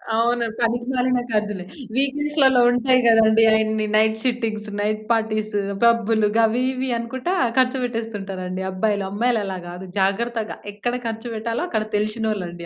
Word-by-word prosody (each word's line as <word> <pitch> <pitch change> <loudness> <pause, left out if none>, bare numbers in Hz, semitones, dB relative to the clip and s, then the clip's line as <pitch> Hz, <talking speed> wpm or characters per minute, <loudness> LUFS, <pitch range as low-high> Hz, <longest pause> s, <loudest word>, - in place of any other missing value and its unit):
అవును. 235 +1 +1
పనికిమాలిన 250 +2 0
ఖర్చులే. 210 -3 -1 0.3
వీక్ 275 +1 +1
డేస్‌లో 275 -4 +3
ఉంటాయి 255 +1 +3
కదండీ. 225 0 +5
అయన్ని 220 0 +1
నైట్ 220 0 +3
షిఫ్టింగ్స్, 225 -4 -1
నైట్ 215 +1 -1
పార్టీస్, 215 -1 0 0.3
పబ్బులు 225 -2 +3
గవి 230 +2 +2
ఇవి 260 +1 -3
అనుకుంటా 255 +9 -3 0.2
ఖర్చు 260 +1 +3
పెట్టేస్తుంటారండి 195 -6 -5
అబ్బాయిలు. 200 +1 0
అమ్మాయిలు 230 +1 +1
అలా 190 -1 -4
కాదు. 180 +2 -8
జాగ్రత్తగా 220 +3 -1 0.2
ఎక్కడ 240 +4 -3
ఖర్చు 225 +2 -5
పెట్టాలో 230 +5 -2
అక్కడ 220 -2 0
తెలిసినోళ్లండి 210 -5 -3
225 Hz, 135 wpm, -22 LUFS, 210-245 Hz, 0.3 s, కదండీ